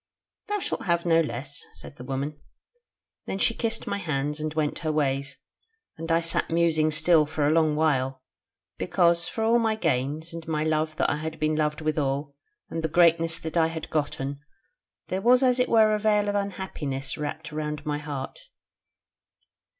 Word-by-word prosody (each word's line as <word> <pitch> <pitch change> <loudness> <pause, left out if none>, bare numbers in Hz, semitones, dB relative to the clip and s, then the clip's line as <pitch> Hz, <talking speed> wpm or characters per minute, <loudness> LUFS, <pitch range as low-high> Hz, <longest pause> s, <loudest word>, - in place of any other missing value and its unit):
'Thou 415 0 0
shalt 400 - -3
have 170 -2 +1
no 165 -1 +4
less,' 135 0 -4
said - - -11
the - - -9
woman. 135 +3 -4 0.9
Then - - -2
she 230 - +2
kissed 230 0 -2
my 200 - -2
hands 150 -4 -2
and 155 0 -2
went 150 -2 0
her 155 -2 -1
ways, 140 -2 -1 0.6
and 165 +1 -5
I 165 +1 +4
sat 165 0 0
musing 165 -2 +2
still 155 0 +4
for 150 -1 -1
a 145 - +3
long 155 -2 +3
while: 135 -4 +1 0.6
because 170 -2 +2
for 225 - -3
all 230 +2 +4
my 220 -1 +1
gains, 155 -1 -1
and 165 -1 -8
my 155 -1 0
love 155 0 0
that - - +1
I 145 - -1
had 160 +1 -5
been 155 0 +1
loved 150 0 0
withal, 145 -2 -1 0.3
and 165 0 -4
the - - +2
greatness 165 0 +4
that 160 -1 -6
I 160 -1 +4
had 160 -1 -6
gotten, 145 -2 -2 0.7
there 190 +1 -1
was 250 +4 +5
as 250 -1 +3
it 250 - +2
were 220 -2 +5
a 210 - +1
veil 210 -1 +2
of 205 - 0
unhappiness 180 -9 -3
wrapped 150 +1 -5
round 150 0 -3
about - - -24
my 150 -1 -1
heart. 145 -3 -6
160 Hz, 185 wpm, -26 LUFS, 150-170 Hz, 0.9 s, was